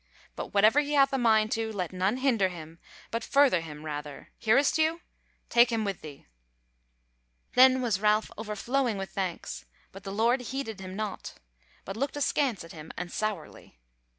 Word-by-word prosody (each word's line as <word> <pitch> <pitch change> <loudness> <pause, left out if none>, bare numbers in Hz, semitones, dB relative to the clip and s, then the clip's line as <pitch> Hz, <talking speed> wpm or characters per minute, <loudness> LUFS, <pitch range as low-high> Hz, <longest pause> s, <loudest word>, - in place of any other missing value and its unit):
But - - -5
whatever 215 +7 +5
he 295 0 -1
hath 275 -1 +4
a 270 - +1
mind 220 -2 +3
to, 225 0 -1
let 185 -4 -4
none 190 +6 0
hinder 240 -8 +2
him, 165 -2 -10 0.3
but 230 0 -2
further 275 -11 +4
him 155 -1 -9
rather; 150 -1 -6
hearest 245 +6 +3
thou? 320 +1 +2 0.5
take 240 0 +5
him 225 -2 0
with 195 -3 -3
thee." 145 -3 -11 1.3
Then 260 0 +6
was 210 -5 0
Ralph 215 0 +2
overflowing 225 +2 -1
with 195 0 -5
thanks, 185 -3 -4 0.3
but 195 0 -12
the 195 - -6
Lord 230 +5 +2
heeded 250 -4 -5
him 185 0 -7
naught, 210 -2 -5 0.5
but 195 - -6
looked 275 +5 -2
askance 275 - 0
at 165 - -12
him 155 -1 -10
and 175 0 -5
sourly. 205 - -5
215 Hz, 170 wpm, -28 LUFS, 185-255 Hz, 1.3 s, Then